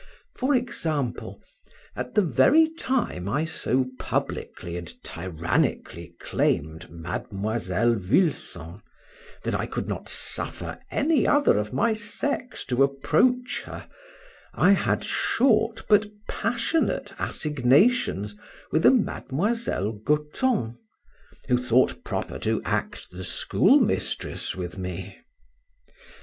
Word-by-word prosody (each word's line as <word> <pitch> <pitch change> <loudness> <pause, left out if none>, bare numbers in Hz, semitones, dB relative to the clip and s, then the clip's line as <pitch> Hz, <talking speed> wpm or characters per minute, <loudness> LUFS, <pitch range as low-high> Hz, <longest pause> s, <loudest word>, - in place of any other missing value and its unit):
For 275 +2 +1
example, 155 - -2 0.5
at 125 0 -5
the 210 - +5
very 260 - +5
time 260 - -2
I 145 +9 0
so 130 -5 0
publically 85 -1 -3
and 85 -1 -6
tyrannically 85 0 -2
claimed 80 +2 -1
Miss 95 +5 -4
Vulson, 100 - 0 0.6
that - - -2
I - - -1
could - - -4
not - - -4
suffer - - -3
any 305 +1 +2
other 290 - +4
of 105 0 -3
my 220 - +2
sex 250 +5 -3
to 125 +1 0
approach 160 - +2
her, - - -8 0.7
I 190 - +5
had 200 - +2
short, 225 -2 +2
but 210 -1 +5 0.2
passionate, 230 +9 -1
assignations 140 - +2 0.4
with 160 - +4
a - - +10
Miss 230 - 0
Goton, 120 - -1 0.7
who 125 -1 +3
thought 125 0 +2
proper - - -4
to - - 0
act - - -3
the 90 +1 -7
schoolmistress - - +1
with 90 0 -6
me. 95 +1 -6
135 Hz, 105 wpm, -25 LUFS, -, 0.7 s, a